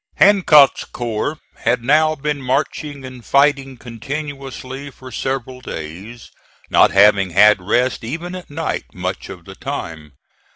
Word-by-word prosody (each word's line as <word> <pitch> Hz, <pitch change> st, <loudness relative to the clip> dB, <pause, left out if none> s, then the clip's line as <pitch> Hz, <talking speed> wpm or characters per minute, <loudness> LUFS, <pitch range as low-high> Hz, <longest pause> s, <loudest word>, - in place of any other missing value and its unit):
Hancock's 175 Hz, -8 st, +5 dB
corps 120 Hz, +5 st, -4 dB, 0.2 s
had 125 Hz, -1 st, 0 dB
now 155 Hz, +4 st, +3 dB
been 150 Hz, 0 st, -3 dB
marching 140 Hz, +1 st, -2 dB
and 130 Hz, -2 st, -10 dB
fighting 140 Hz, -1 st, +2 dB
continuously 135 Hz, +2 st, -7 dB
for 130 Hz, -1 st, -13 dB
several 130 Hz, +1 st, -4 dB
days, 95 Hz, +6 st, -8 dB, 0.4 s
not -, -, +6 dB
having 100 Hz, -1 st, +4 dB
had 105 Hz, +2 st, +5 dB
rest 120 Hz, +8 st, 0 dB
even 165 Hz, +9 st, -5 dB
at 185 Hz, -1 st, -8 dB
night 160 Hz, +2 st, -4 dB
much 90 Hz, +1 st, -4 dB
of 90 Hz, -3 st, -10 dB
the 95 Hz, -, -10 dB
time. 75 Hz, -5 st, -6 dB
130 Hz, 130 wpm, -19 LUFS, 105-145 Hz, 0.4 s, not